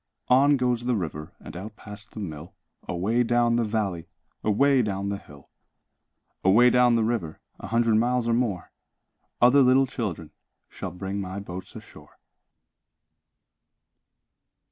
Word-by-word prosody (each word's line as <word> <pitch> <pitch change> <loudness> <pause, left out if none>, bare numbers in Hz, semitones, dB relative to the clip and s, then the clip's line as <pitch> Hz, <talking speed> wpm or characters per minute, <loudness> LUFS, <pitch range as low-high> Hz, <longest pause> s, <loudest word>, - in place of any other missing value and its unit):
On 140 +3 +5
goes 125 -2 0
the 125 -1 +1
river 80 -5 -5
And - - -11
out 105 +4 -8
past 105 +1 -12
the - - -8
mill, 80 -4 -7 0.3
Away 105 +8 0
down 120 0 +2
the 120 - +2
valley, 100 -6 -2 0.4
Away 135 +5 +3
down 100 -3 -2
the 100 0 -3
hill. 70 -5 -17 0.9
Away 115 +6 +5
down 125 -1 +4
the 115 - +2
river, 110 -9 -2 0.2
A - - -8
hundred 115 -1 +2
miles 120 +1 +1
or 115 - +2
more, 115 -7 -1 0.7
Other 130 +3 +6
little 130 +1 +5
children 105 - -5 0.4
Shall 95 - -6
bring 95 +3 -5
my 95 +1 -5
boats 95 -2 -9
ashore. - - -14
110 Hz, 140 wpm, -25 LUFS, 95-120 Hz, 0.9 s, Other